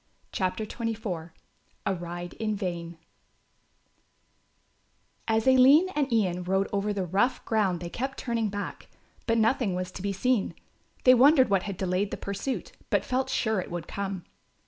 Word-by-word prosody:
CHAPTER 190 +3 -1
XXIV 215 -7 -4 0.6
A 195 - +1
RIDE 175 0 -6
IN 215 -1 0
VAIN 170 -4 -4 2.3
As 225 0 +2
Aline 265 +7 +6
and 290 -7 -1
Ian 185 -6 +1
rode 190 +2 +1
over 200 +1 0
the 195 -2 -2
rough 200 +9 +1
ground 195 -6 +1
they 175 - -5
kept 265 +6 -3
turning 230 -3 -1
back; 205 0 -6 0.4
but 230 0 +2
nothing 225 -3 +2
was 180 0 -3
to 185 - -8
be 200 +1 -1
seen. 220 +2 0 0.5
They 255 - +8
wondered 260 -1 +6
what 195 -2 +4
had 195 - -5
delayed 190 +2 0
the - - -4
pursuit, 200 +7 -4 0.2
but - - +1
felt 260 +1 0
sure 220 -5 +1
it - - -8
would 170 -1 -5
come. 195 -3 -4
205 Hz, 155 wpm, -27 LUFS, 185-240 Hz, 2.3 s, They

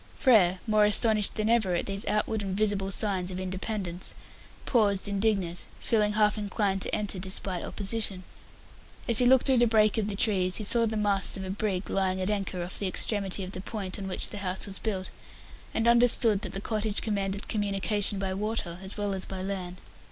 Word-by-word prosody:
Frere, 190 -8 +4
more 215 -2 +3
astonished 210 0 +4
than 215 -1 -1
ever 220 -6 +2
at - - -2
these 195 0 -4
outward 215 0 0
and 195 -1 -4
visible 205 -2 0
signs 195 -3 -1
of 185 0 -5
independence, 185 -1 -4 0.5
paused, 205 -6 +2
indignant, 195 -4 -1
feeling 210 -3 +1
half 210 0 +2
inclined 200 -1 -1
to - - 0
enter 205 -3 -1
despite 185 -1 -2
opposition. 200 -2 -2 0.8
As 230 -2 +8
he 245 - +4
looked 260 0 +5
through 265 -3 +4
the 240 - +4
break 215 0 +3
of 210 - -1
the 205 - -4
trees, 190 -4 +2
he 215 - +1
saw 230 +3 +2
the 220 0 -3
masts 200 -2 0
of 190 - -6
a 190 - -5
brig 200 -2 -2
lying 190 -1 0
at 185 +2 -1
anchor 195 -3 -2
off 180 - -5
the 200 - -1
extremity 195 0 +2
of 185 - -7
the 185 - -6
point 195 -2 -5
on 195 - -5
which 185 - +1
the 205 - -7
house 185 -1 -1
was 195 -1 -4
built, 190 -4 -3 0.6
and 225 +1 -1
understood 235 -3 +4
that - - -5
the 195 - -4
cottage 215 -1 -1
commanded 200 -2 -3
communication 205 0 0
by 190 -1 -2
water 195 -4 -3
as 190 +2 -5
well 205 -1 -2
as 190 -1 -2
by 190 -1 -6
land. 185 -2 -4
200 Hz, 200 wpm, -27 LUFS, 190-215 Hz, 0.8 s, As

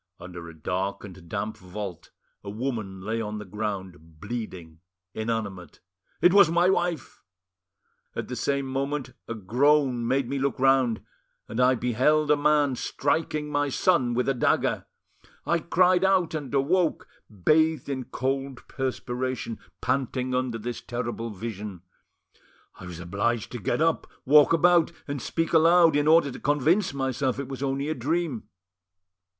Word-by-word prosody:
Under 85 -1 -9
a - - -11
dark 95 +5 -3
and 90 -4 -11
damp 105 +3 -3
vault 95 -1 -7 0.3
a 100 - -7
woman 110 -4 -4
lay 110 +4 -2
on 105 -1 -4
the 105 - -7
ground, 95 -6 -6
bleeding, 95 -7 -6 0.3
inanimate—it 100 - -2
was 200 -5 +7
my 175 +2 +3
wife! 175 -5 -2 0.9
At - - -4
the - - -5
same 140 -1 -1
moment, 135 0 -3
a 115 - -4
groan 125 +3 +2
made 130 0 +1
me 140 +2 -2
look 135 -2 -1
round, 130 -4 +3 0.4
and 110 - -5
I 130 +1 +5
beheld 130 +6 +2
a - - +6
man 145 -2 +2
striking 150 +2 -1
my 145 0 +1
son 130 -5 +2
with 125 - 0
a 135 - +3
dagger. 125 - +1 0.6
I 170 - +2
cried 180 +2 +3
out 190 -4 +3
and 150 -4 -4
awoke, 160 +5 +1 0.2
bathed 155 - +2
in 130 -3 -3
cold 135 0 -3
perspiration, 130 -2 -3 0.2
panting 130 0 -1
under 125 -2 -1
this 120 +2 -5
terrible 120 -1 -4
vision. 105 -3 -7 0.9
I 90 - -11
was 85 -2 -8
obliged 100 +6 -1
to 120 - -5
get 135 +9 0
up, 165 0 +1 0.2
walk 150 +2 +6
about, 170 0 +4 0.2
and 140 -2 -4
speak 165 +6 -2
aloud, 165 0 +6
in 145 +1 +2
order 160 -3 +5
to - - -9
convince 150 +7 +2
myself 135 -1 -1
it 140 -1 -4
was 135 -1 -6
only 140 +1 -1
a 155 - 0
dream. 145 -5 -2
130 Hz, 150 wpm, -26 LUFS, 110-150 Hz, 0.9 s, was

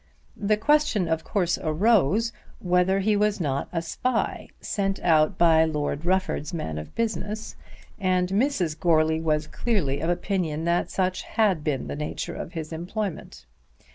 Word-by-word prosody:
The 210 +1 +1
question 230 - +2
of 160 0 -1
course 180 -5 0
arose 210 +5 +2 0.2
whether 180 +2 +2
he 210 +2 +2
was 210 0 +1
not 140 -5 -1
a 165 -2 -2
spy 245 +7 -2
sent 195 -2 -2
out 160 +1 +3
by 160 -2 +5
Lord 150 0 -2
Rufford's 185 -2 0
man 80 - -3
of 75 - -10
business, 220 -1 -3 0.4
and 185 -2 +2
Mrs. 195 - +1
Goarly 160 -2 +3
was 155 -1 +1
clearly 155 - -1
of 165 - -1
opinion 175 -3 -1
that 170 +1 +1
such 185 -1 -1
had 200 -8 +1
been 145 -5 -1
the - - -5
nature 150 0 -4
of 170 - -7
his 160 -1 -5
employment. 170 - -5
175 Hz, 150 wpm, -25 LUFS, 155-205 Hz, 0.4 s, by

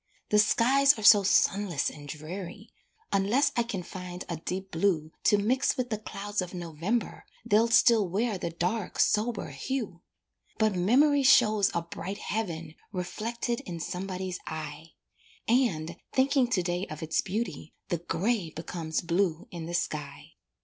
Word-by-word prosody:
The 210 - +4
skies 270 +6 +4
are 215 - -6
so 205 -1 +9
sunless 195 -4 +2
and 145 -1 -11
dreary, 175 +8 -7 0.4
Unless 205 +8 +3
I 240 - +3
can 225 -6 -4
find 180 0 -7
a 170 - -3
deep 185 +4 -5
blue 160 -3 0
To 210 - +5
mix 245 +6 +1
with 245 -2 -2
the 215 - -1
clouds 205 -1 -4
of 180 0 -6
November 175 +7 -3 0.2
They'll 215 +3 +4
still 230 -4 +5
wear 210 +2 -1
the 170 - -2
dark, 180 +5 -2
sober 220 +1 +1
hue; 190 - -4 0.6
But 215 -2 +2
memory 265 +11 +4
shows 215 -7 +5
a 170 - 0
bright 185 +3 -6
heaven 170 -9 -4 0.2
Reflected 230 +6 -3
in 170 -2 -7
somebody's 185 +1 -4
eye, 155 +1 -7 0.5
And, 185 -10 +1 0.2
thinking 265 -1 +3
to 200 -7 0
day 175 +2 -2
of 155 +1 -7
its 160 0 +1
beauty, 185 -6 -4
The 175 - -1
grey 185 +2 -1
becomes 160 0 -4
blue 170 -1 0
in 165 -2 -6
the 175 - -3
sky. 150 -4 -4
190 Hz, 150 wpm, -28 LUFS, 170-225 Hz, 0.6 s, so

